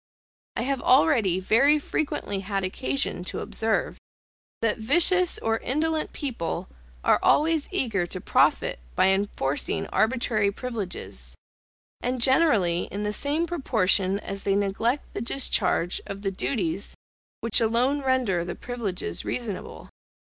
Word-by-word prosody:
I - - -1
have 270 0 -1
already 245 - +3
very 265 +10 +4
frequently 285 -9 -3
had 195 0 -3
occasion 140 -2 -1
to - - -3
observe, 220 0 -1 0.6
that 225 -1 +1
vicious 350 - +4
or 225 0 -1
indolent 310 +4 -1
people 230 - -4 0.3
are - - +4
always 315 -1 +2
eager 200 -9 0
to - - -6
profit - - +1 0.2
by - - +4
enforcing 190 -8 -1
arbitrary 220 -3 +1
privileges; 190 - -5 0.7
and 250 +1 -2
generally 235 - +3
in 205 +2 -5
the 210 0 -1
same 295 +8 0
proportion 210 - +1
as 195 0 -6
they 195 -1 0
neglect 205 +7 -1
the - - -4
discharge 235 -8 +1
of 200 0 -7
the 195 - -1
duties 190 -3 -2 0.5
which 230 +1 +4
alone 245 +6 +2
render 255 -10 +1
the 175 0 -5
privileges 200 - -3
reasonable. 225 -6 -5
220 Hz, 125 wpm, -25 LUFS, 195-265 Hz, 0.7 s, very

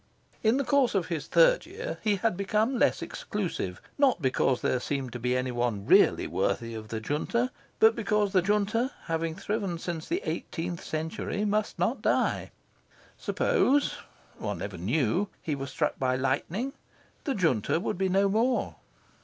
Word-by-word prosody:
In 225 +3 +3
the 280 - +1
course 275 -4 +2
of 185 -3 0
his 165 -4 -3
third - - +4
year 470 +5 -6
he 210 -2 +2
had 220 0 0
become 215 +6 +1
less - - +2
exclusive. 170 - -4 0.2
Not 275 -8 +4
because 130 -2 +1
there 130 - +1
seemed 135 -2 -3
to 125 - -5
be 125 +2 +1
any 130 0 -1
one 120 -5 -1
really - - +5
worthy 115 -1 -1
of 110 -1 -7
the 110 0 -3
Junta; 235 - -1 0.3
but 225 +1 +6
because 210 -2 +1
the 185 - +5
Junta, 210 +5 +1
having 165 0 -2
thriven 200 -2 -2
since 165 -1 -5
the 360 +4 -1
eighteenth 170 0 -4
century, 160 +6 -3
must 210 +1 0
not - - 0
die. - - +1 0.7
Suppose 285 +2 +2 0.4
one - - -3
never - - -6
knew 160 - +1
he 155 - -3
were 135 -1 -4
struck 130 - -1
by 130 -1 +1
lightning, 155 - -1 0.5
the 275 - 0
Junta 160 - +1
would 175 - -3
be 190 -1 +2
no 195 +2 +3
more. 230 +5 +1
185 Hz, 165 wpm, -28 LUFS, 135-220 Hz, 0.7 s, but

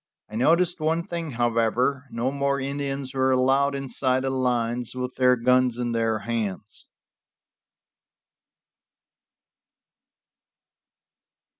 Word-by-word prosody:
I - - -7
noticed 170 +9 +2
one 160 +2 0
thing, 165 -4 -5
however; 120 +3 0
no 120 +2 -2
more 140 0 0
Indians 140 -1 -3
were 130 0 +1
allowed 135 +2 +2
inside 130 -1 -1
the 135 - -1
lines 125 -2 -1
with 125 0 -4
their 125 -1 +5
guns 125 0 +2
in 120 -1 -2
their 115 -1 0
hands. 110 -3 -4
130 Hz, 100 wpm, -25 LUFS, 120-140 Hz, -, their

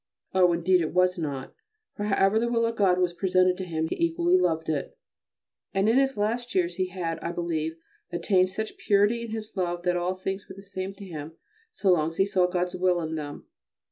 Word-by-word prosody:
Oh! 185 -2 +5
indeed 175 +2 +3
it 160 +1 -3
was 180 0 +3
not, 140 -4 -4 0.4
for 205 - -4
however 200 +1 +3
the 235 +1 0
will 230 -1 +2
of 230 0 -1
God 190 -4 +3
was 180 -1 +1
presented 185 0 +3
to 190 - -4
him 160 -2 -2
he - - -2
equally 170 +2 +2
loved 165 -3 +1
it. 150 -3 -3 0.8
And 195 +2 +2
in 225 - +4
his 270 -1 +2
last 235 +4 -1
years 175 -2 +1
he 185 -1 0
had, 170 -3 -4
I 170 - -3
believe, 165 -2 -2 0.4
attained 185 +2 +2
such 215 +3 -5
purity 205 +3 +3
in 235 - -6
his 220 0 -6
love 175 -2 -2
that 180 0 +1
all 180 +1 -1
things 190 +1 -5
were 190 - -9
the 195 - -12
same 195 0 -5
to 200 - -10
him 160 -3 -7 0.4
so 200 - +2
long 155 -3 +3
as 165 - -6
he 195 - +4
saw 185 -3 +2
God's 180 0 -1
will 180 -1 +2
in 160 -1 -3
them. 150 -2 -6
185 Hz, 220 wpm, -27 LUFS, 170-195 Hz, 0.8 s, Oh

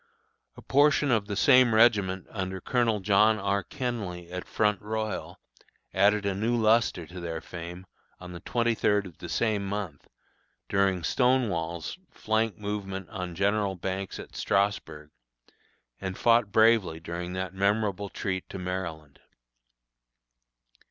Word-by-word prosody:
A - - -12
portion 145 0 +3
of 110 -4 +1
the 105 - -3
same 125 0 +5
regiment 100 -5 +3
under 95 -2 -4
Colonel 115 -2 +1
John 105 +2 +4
R. 100 -1 0
Kenly, 90 -7 -5
at 90 0 -6
Front 105 -1 +1
Royal, 110 -1 -4 0.5
added 100 +2 +3
new 105 +5 0
lustre 110 -5 +2
to 90 +3 -10
their 85 -2 -4
fame, 85 +1 -8 0.3
on 90 0 -9
the 85 - -8
twenty 120 +3 0
third 105 -2 +1
of 90 -5 -12
the - - -7
same 110 -3 0
month, 100 -6 -5 0.6
during 95 -3 +1
"Stonewall's" 90 - 0
flank 110 -1 -1
movement 100 -2 -5
on 90 -4 -5
General 100 +1 +1
Banks 95 +2 -4
at - - -10
Strasburg, 80 -7 -1 0.9
and 95 -1 -5
fought 115 -3 +3
bravely 110 -8 +4
during 85 +2 -5
that 95 -1 -4
memorable 100 0 0
retreat 95 -2 -4
to - - -6
Maryland. 85 -6 -5
100 Hz, 130 wpm, -28 LUFS, 90-110 Hz, 0.9 s, same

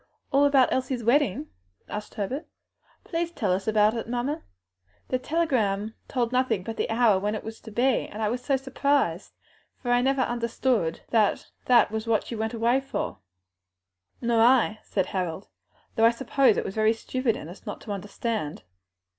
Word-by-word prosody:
all 280 +1 +5
about 275 -3 +4
Elsie's 255 -2 -1
wedding?" 235 - +2 0.4
asked 210 0 -6
Herbert. 255 - -3 0.6
"Please 335 0 -2
let - - -6
us 190 +2 0
hear 215 -1 +4
it, 225 - -7
mamma. 245 +5 -2 0.7
The 255 - 0
telegram 225 -10 0
told 245 -3 -1
nothing 250 -6 +1
but 225 +3 -5
the - - -2
hour 225 -4 +4
when 210 +2 -1
it 215 - -5
was 220 0 -8
to 220 - -10
be, 245 +3 +1
and 210 - -9
I 215 - +1
was 245 +3 -2
so 275 -1 +2
surprised, 265 - 0 0.4
for 245 - -3
I 245 0 +4
never 270 +1 +2
understood 235 -7 0
that 220 -3 +1
that 240 -4 +5
was 220 +1 -3
what 225 -2 +2
she 235 - -5
went 220 +1 -2
away 235 +3 +2
for." 270 - -4 1.0
"Nor 235 -1 +2
I," 230 -3 +4
said 190 - -1
Harold; 185 0 -4 0.5
"though 225 - +4
I - - +8
suppose 260 0 +2
it - - -1
was - - -4
very 220 +1 +3
stupid 245 +1 -1
in - - -8
us 175 +4 -12
not - - -5
to 210 - -7
understand." 205 -3 -4
230 Hz, 180 wpm, -26 LUFS, 210-255 Hz, 1.0 s, I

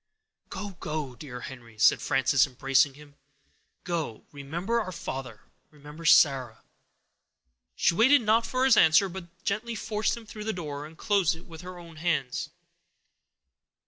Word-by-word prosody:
"Go, 205 -1 -6
go, 150 -4 -4
dear 125 0 -9
Henry," 120 -4 -10
said - - +4
Frances, 135 0 +3
embracing 135 +2 +2
him; 145 -1 -16 0.7
"go; 165 -10 -4
remember 170 +11 -2
our 185 -4 -5
father; 130 - -6 0.3
remember 150 +2 -12
Sarah." 130 -7 +4 1.1
She - - +2
waited 245 +8 +5
not 225 +2 +3
for 255 0 +1
his 265 -3 +6
answer, 160 +3 +5
but 190 -1 -8 0.2
gently 225 +4 -2
forced 215 +2 -1
him 230 - -11
through 215 -1 -8
the 220 - -1
door, 150 -4 -6
and 160 +1 -16
closed 200 -6 +2
it 165 - -14
with 165 -1 -11
her 180 0 -9
own 170 -2 -12
hands. 160 -1 -1
160 Hz, 145 wpm, -27 LUFS, 140-200 Hz, 1.1 s, his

